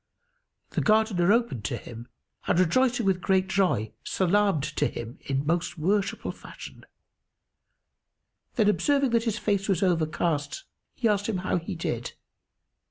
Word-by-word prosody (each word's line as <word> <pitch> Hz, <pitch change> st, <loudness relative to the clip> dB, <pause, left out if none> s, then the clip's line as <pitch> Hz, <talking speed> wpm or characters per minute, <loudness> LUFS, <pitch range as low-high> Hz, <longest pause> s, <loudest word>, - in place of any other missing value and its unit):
The -, -, 0 dB
Gardener 215 Hz, -4 st, +3 dB
opened 230 Hz, -, +1 dB
to -, -, -2 dB
him 120 Hz, 0 st, -10 dB, 0.4 s
and -, -, +2 dB
rejoicing 245 Hz, +6 st, +2 dB
with 190 Hz, -2 st, +1 dB
great 190 Hz, 0 st, +2 dB
joy 185 Hz, -, +1 dB
salamed 190 Hz, -4 st, +2 dB
to -, -, +3 dB
him 120 Hz, +2 st, -7 dB
in 135 Hz, +1 st, -2 dB
most 170 Hz, +3 st, -1 dB
worshipful 195 Hz, +5 st, 0 dB
fashion; -, -, -12 dB, 1.7 s
then, 215 Hz, -3 st, +3 dB
observing 275 Hz, +4 st, +2 dB
that 230 Hz, 0 st, +2 dB
his 225 Hz, -3 st, 0 dB
face 200 Hz, -1 st, -1 dB
was 190 Hz, -1 st, +2 dB
overcast, 160 Hz, -, 0 dB, 0.3 s
he 240 Hz, -, +1 dB
asked 205 Hz, 0 st, +1 dB
him 210 Hz, -, 0 dB
how -, -, +1 dB
he 175 Hz, +3 st, -6 dB
did. 120 Hz, -7 st, -3 dB
190 Hz, 140 wpm, -27 LUFS, 160-215 Hz, 1.7 s, Gardener